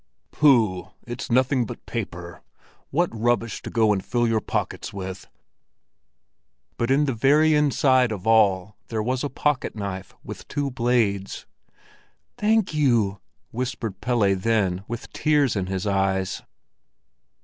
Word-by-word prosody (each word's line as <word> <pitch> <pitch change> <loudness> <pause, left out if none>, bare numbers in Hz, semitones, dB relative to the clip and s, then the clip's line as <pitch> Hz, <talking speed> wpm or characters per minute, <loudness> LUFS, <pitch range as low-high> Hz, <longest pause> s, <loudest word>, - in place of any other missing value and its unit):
"Pooh, 110 - +3 0.2
it's 120 0 -6
nothing 130 +1 +2
but - - -9
paper! 90 -7 -6 0.5
What 175 +4 +1
rubbish 115 0 0
to - - -7
go 110 -2 +3
and 95 -2 -2
fill 120 -1 0
your 110 -1 +1
pockets - - -3
with!" 95 -1 -7 1.5
But 115 - -1
in 140 +3 +3
the 135 - -1
very 150 +7 +4
inside 130 -4 +3
of 100 -2 -5
all 105 -3 +3
there 110 -2 -2
was 130 +3 -1
a 145 - -1
pocket 145 -2 -1
knife 95 -3 -6
with - - -9
two 140 -1 -2
blades. 115 -6 0 0.9
"Thank 215 -3 +1
you!" 115 -10 +2 0.3
whispered 115 -5 -4
Pelle 110 -6 +2
then, 95 -3 0
with 120 0 -7
tears 145 -5 +2
in 95 -2 -2
his 95 +1 -3
eyes. 95 -1 0
115 Hz, 135 wpm, -24 LUFS, 100-130 Hz, 1.5 s, very